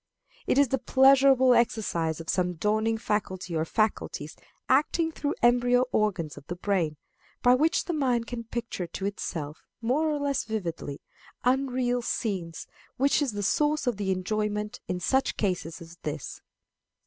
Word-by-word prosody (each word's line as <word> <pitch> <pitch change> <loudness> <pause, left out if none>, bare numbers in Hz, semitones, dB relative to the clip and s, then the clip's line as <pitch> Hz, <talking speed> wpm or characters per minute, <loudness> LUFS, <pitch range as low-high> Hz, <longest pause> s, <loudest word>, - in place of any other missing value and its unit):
It - - +2
is 280 -3 +5
the 265 - 0
pleasurable 265 0 +5
exercise 185 -9 +1
of 165 - -8
some 180 0 +1
dawning 215 +5 +1
faculty 190 -5 -2
or 160 0 0
faculties 195 -7 -1 0.3
acting 315 +5 +2
through 290 -2 -2
embryo 245 +1 +4
organs 190 -8 0
of 140 - -12
the 175 - -4
brain, 175 -5 -1 0.5
by 245 0 +6
which 310 +6 +2
the 350 - -2
mind 250 -6 +1
can 230 -1 -6
picture 230 -6 -4
to 190 - -5
itself, 160 -6 -4 0.2
more 265 +7 +1
or 300 - 0
less 285 -2 0
vividly, 170 -9 -4 0.4
unreal 250 -1 +1
scenes, 190 -9 -3 0.3
which 275 +3 +3
is 275 -6 0
the 205 0 -3
source 300 +7 +1
of 245 -5 0
the 200 -2 -2
enjoyment 210 +2 -2
in 180 -1 -2
such 265 +9 +1
cases 180 -5 -2
as 170 +1 -12
this. 150 -2 -6
220 Hz, 155 wpm, -27 LUFS, 180-260 Hz, 0.5 s, by